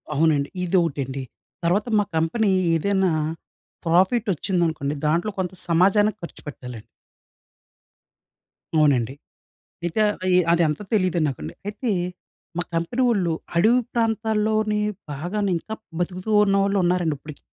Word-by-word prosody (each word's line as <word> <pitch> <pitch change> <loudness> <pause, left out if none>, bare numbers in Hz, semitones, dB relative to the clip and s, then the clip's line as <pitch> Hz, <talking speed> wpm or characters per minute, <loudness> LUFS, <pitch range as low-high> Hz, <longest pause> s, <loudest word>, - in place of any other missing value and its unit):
అవునండి, 145 -2 +2
ఇదొకటండి. 145 -7 0 0.4
తర్వాత 185 +6 +2
మా - - +3
కంపెనీ 195 +7 +1 0.3
ఏదైనా 190 +1 +2 0.7
ప్రాఫిట్ 190 +7 +3
వచ్చిందనుకోండి 160 -4 -1
దాంట్లో 170 +7 +1
కొంత 185 -1 -2
సమాజానికి 200 +5 +3
ఖర్చుపెట్టాలండి. 125 -8 -9 1.9
అవునండి. 135 -6 +3 0.7
అయితే 175 +5 -1 0.5
అది 170 0 +4
అంతా 150 +6 -3
తెలీదు 185 -4 +2
నాకండి. 80 - -5
అయితే 210 +4 -2 0.7
మా - - +2
కంపెనీ 170 +10 0
వాళ్ళు 190 -7 +1 0.2
అడవి 225 +8 +5
ప్రాంతాల్లోనే 220 -2 +1 0.3
బాగానే 190 +8 -2
ఇంకా 220 +6 -6 0.2
బ్రతుకుతూ 180 +3 -3
ఉన్నవాళ్ళు 195 0 +2
ఉన్నారండి 175 -3 +1
ఇప్పటికి. 150 +1 -11
180 Hz, 105 wpm, -23 LUFS, 160-210 Hz, 1.9 s, అడవి